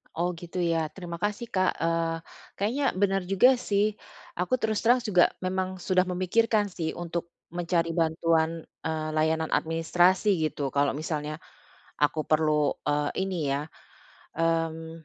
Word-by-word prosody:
Oh 175 +2 0
gitu 170 +1 -8
ya? 165 -2 +1
Terima 170 -3 -7
kasih 210 +4 -3
Kak. 185 -1 +1
Eee, 165 0 0 0.4
kayaknya 230 +8 -1
bener 195 0 +2
juga 250 +6 +5
sih. 205 -1 +1 0.5
Aku 180 +8 +2
terus 220 -3 -1
terang 245 +1 +3
juga 180 -6 +5 0.2
memang 185 0 -1
sudah 185 0 +1
memikirkan 205 +3 +1
sih 165 -3 -3
untuk 170 0 -5 0.2
mencari 170 -1 0
bantuan, 165 0 +1 0.2
eee, 155 -1 -2
layanan 160 +1 +1
administrasi 175 +4 +2
gitu 140 -3 -4
kalo 140 0 +1
misalnya 150 0 -3 0.7
aku 155 +1 +1
perlu, 150 -2 +2 0.2
eee, 145 0 +1
ini 190 -1 -2 0.2
ya, 150 +2 -4 0.7
mmm, 165 0 -1
170 Hz, 135 wpm, -27 LUFS, 160-190 Hz, 0.7 s, juga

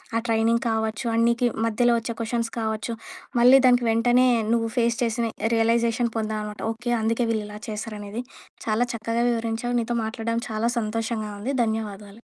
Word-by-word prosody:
ఆ - - +4
ట్రైనింగ్ 230 +1 +2
కావచ్చు, 220 +2 -1
ఆ - - +1
నీకి 235 +1 +2 0.2
మధ్యలో 240 +2 +3
వచ్చే 230 +1 -4
క్వెషన్స్ 230 0 -2
కావచ్చు, 220 +1 -2 0.5
మళ్ళీ 250 +3 +8
దానికి 245 -1 +4
వెంటనే 245 +3 +4 0.3
నువ్వు 230 -1 +1
ఫేస్ 235 -1 +2
చేసిన 230 0 0 0.3
రియలైజేషన్ 230 +1 +2
పొందామనమాట. 215 -1 -3
ఓకే 240 +2 -4
అందుకే 230 +2 +1
వీళ్ళు 215 -2 -1
ఇలా 210 0 -8
చేశారనేది, 210 +1 -5 0.4
చాలా 225 +2 +2
చక్కగా 230 +1 -1
వివరించావు. 230 +1 -2
నీతో 235 +1 -2
మాట్లాడడం 230 +1 -2
చాలా 220 +2 0
సంతోషంగా 220 -1 -2
ఉంది. 260 +6 -2
ధన్యవాదాలు. 210 -1 -5
230 Hz, 150 wpm, -24 LUFS, 220-235 Hz, 0.5 s, మళ్ళీ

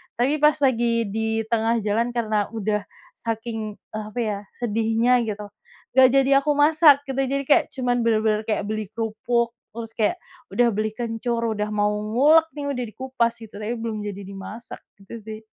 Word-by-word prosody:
Tapi 270 +6 +1
pas 300 0 +5
lagi 235 -3 +2
di 220 +1 -1
tengah 230 0 +2
jalan 230 +4 0
karena 215 -3 +1
udah 210 -1 -1 0.3
saking, 225 -1 -4 0.2
eee, 215 0 -5
apa 245 - -6
ya, 210 -3 -1 0.2
sedihnya, 230 +2 +2
gitu, 210 -1 -5 0.5
nggak 260 -1 +8
jadi 275 0 +4
aku 300 - +3
masak, 295 -1 +6
gitu. 270 - -2
Jadi 275 +1 -1
kayak, - - +5
cuman 245 -2 0
bener-bener 215 -1 +2
kayak, 215 -2 0
beli 215 0 -2
kerupuk, 230 +1 -1 0.2
terus 230 -1 -6
kayak, 220 +10 +2 0.4
udah 245 -1 +4
beli 215 +1 -1
kencur, 235 0 -2 0.2
udah 210 0 -1
mau 205 0 +2
ngulek 255 +10 +4
nih, 290 -1 -5
udah 250 -2 -2
dikupas, 245 -1 -1
gitu. 210 -2 -11
Tapi 220 +3 -3
belum 225 -2 -4
jadi 200 0 -6
dimasak, 200 +4 -9 0.2
gitu 230 +4 -9
sih. 215 0 -8
230 Hz, 170 wpm, -23 LUFS, 215-245 Hz, 0.5 s, nggak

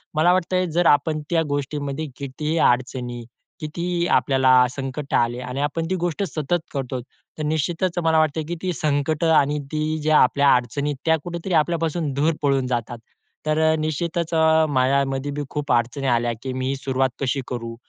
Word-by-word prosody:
मला 175 +4 +4
वाटतंय 185 0 +1
जर 175 +1 +1
आपण 155 +1 -3
त्या 165 -2 +2
गोष्टीमध्ये 145 +1 -3
कितीही 150 +4 -3
अडचणी, 125 -3 0 0.4
कितीही 170 +3 -2
आपल्याला 130 +1 +3 0.2
संकट 135 +2 -6
आले 120 +1 +1
आणि 125 +2 -4
आपण 155 +3 -1
ती 185 - +1
गोष्ट 175 +2 -1
सतत 165 0 -1
करतो, 130 -2 -3 0.4
तर - - -2
निश्चितच 165 +4 -1
मला 160 -1 +3
वाटतं, 155 0 +1
की 175 - -3
ती 185 -1 -1
संकटं 155 +2 0
आणि 145 0 +3
ती 155 +1 -1
ज्या 155 0 +4
आपल्या 140 +2 +4
अडचणी 125 +4 -1
आहेत, 145 - -3
त्या 160 0 +4
कुठेतरी 175 +1 -4
आपल्यापासून 165 -1 +1
दूर 150 +4 +1
पळून 135 -3 +1
जातात. 120 -1 -2 0.5
तर 155 0 +1
अ, - - +2
निश्चितच 165 +2 -2
अ, 160 0 +4
माझ्यामध्ये 135 +1 +1
बी 145 +1 -4
खूप 150 -1 -3
अडचणी 120 +4 0
आल्या, 120 -1 +1
की 130 -1 -3
"मी 130 0 -2
ही 135 - 0
सुरुवात 135 -1 0
कशी 135 +1 0
करू? 115 -2 -5
145 Hz, 175 wpm, -22 LUFS, 130-160 Hz, 0.5 s, मला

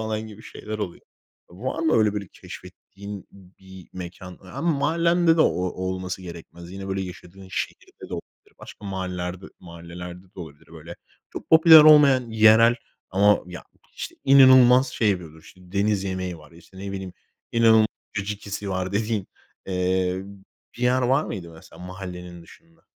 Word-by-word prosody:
falan 110 -1 -3
gibi 110 0 -13
şeyler 110 -1 -8
oluyor. 95 -5 -6 0.5
Var 115 - -5
mı 160 -1 +1
öyle 110 -2 +3
böyle 100 -3 -5
keşfettiğin 100 0 -11
bir 95 -1 -16
mekân? 90 0 -9
Ama 95 - -3
mahallende 170 +2 +2
de - - +2
o - - +6
olması 95 +1 -4
gerekmez. 85 0 -11
Yine 95 +1 -8
böyle 95 0 -2
yaşadığın 95 +1 -11
şehirde - - -6
de - - -3
olabilir. - - -12
Başka 105 - -13
mahallelerde 90 -1 -5
mahallelerde 85 +1 -10
de - - -9
olabilir. 75 -4 -12
Böyle - - -11 0.3
çok - - -9
popüler 160 0 +9
olmayan, 145 -5 +6
yerel 110 +1 +6 0.4
ama 100 +2 +4
ya 90 0 -10 0.3
işte - - -7
inanılmaz 130 -1 +7
şey 110 -3 +1
yapıyor 80 -4 -5
işte 90 - -17
deniz 100 0 0
yemeği 95 -2 -4
var, 75 +1 -17
işte 85 +3 -17
ne 100 0 -6
bileyim 95 -2 -6 0.4
inanılmaz 115 -1 +5 0.3
caciki'si 100 0 -5
var 95 0 -3
dediğin, 105 -1 -1 0.4
eee, 90 0 -1
b 100 -1 -14 0.3
bir - - -6
yer 125 +1 +2
var 135 +5 +2
mıydı 90 -6 -7
mesela 80 +2 -15
mahallenin 90 -2 -9
dışında? 165 - -20
95 Hz, 155 wpm, -23 LUFS, 90-110 Hz, 0.5 s, popüler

